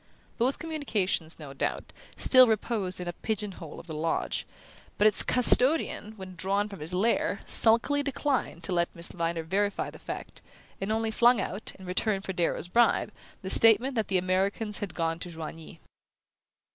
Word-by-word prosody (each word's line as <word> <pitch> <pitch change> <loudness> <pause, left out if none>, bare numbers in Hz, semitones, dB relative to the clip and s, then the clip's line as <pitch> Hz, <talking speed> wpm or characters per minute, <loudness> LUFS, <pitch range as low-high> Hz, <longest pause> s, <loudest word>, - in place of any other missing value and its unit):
Both 255 +4 +1
communications, 220 - -2
no 145 -4 -10
doubt, 135 - -4 0.2
still 255 -1 +6
reposed 210 -4 -1
in 180 - -6
a 175 - -3
pigeon 210 +1 -4
hole 165 -4 -10
of - - -12
the 165 - -8
loge; 160 +2 -2 0.5
but 205 - +2
its 215 -2 +6
custodian, 250 -2 +3
when 190 -2 -10
drawn 195 +4 +1
from 200 -2 -10
his 160 +4 -4
lair, 220 +6 0
sulkily 235 +6 +4
declined 280 - -2
to 175 - -1
let 170 0 -1
Miss 170 0 -7
Viner 165 -1 -3
verify 200 +5 -2
the - - -14
fact, - - -8 0.4
and 195 +2 -2
only 220 0 -1
flung 240 +1 +4
out, 195 +2 -3
in 190 - -13
return 195 +2 -1
for 190 - -5
Darrow's 175 0 -1
bribe, 230 +2 +2 0.3
the 190 - -3
statement 230 +4 +5
that 220 -3 -1
the 190 - +1
Americans 195 +4 -1
had 195 -5 -6
gone 165 -1 -2
to 175 - -7
Joigny. 160 -1 -9
195 Hz, 170 wpm, -27 LUFS, 175-225 Hz, 0.5 s, still